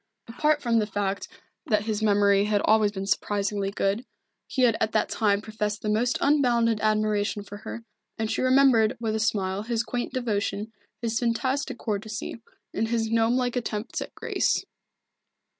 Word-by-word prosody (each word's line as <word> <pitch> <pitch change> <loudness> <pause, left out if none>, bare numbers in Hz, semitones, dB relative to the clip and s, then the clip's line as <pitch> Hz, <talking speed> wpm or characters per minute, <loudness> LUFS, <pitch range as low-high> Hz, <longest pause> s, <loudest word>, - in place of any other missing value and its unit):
Apart 295 +5 +1
from 235 -2 +3
the 210 - 0
fact 200 -1 -2 0.4
that 210 -3 +2
his 215 -1 -2
memory 200 -1 +4
had 210 -1 +2
always 215 -1 +4
been 195 -1 -5
surprisingly 200 0 0
good, 200 +3 -1 0.4
he 260 - 0
had 235 -3 +5
at 215 - 0
that - - +1
time 205 -2 +1
professed 215 -1 -3
the 215 - -1
most 235 +4 +1
unbounded 240 -6 +3
admiration 215 -1 +1
for 205 0 -9
her, 230 +2 -7 0.3
and 220 -1 -2
she - - -1
remembered 255 -4 +4
with 225 -2 -1
a 220 - -1
smile 200 -3 0
his 230 +1 -1
quaint 240 +2 -3
devotion, 215 -3 -2 0.3
his 225 -1 0
fantastic 255 +3 -1
courtesy, 215 +1 -4 0.3
and 225 +2 0
his 225 -1 -1
gnome 230 +1 +3
like 250 -1 0
attempts 225 -2 -3
at - - -7
grace. - - 0
220 Hz, 165 wpm, -26 LUFS, 205-235 Hz, 0.4 s, had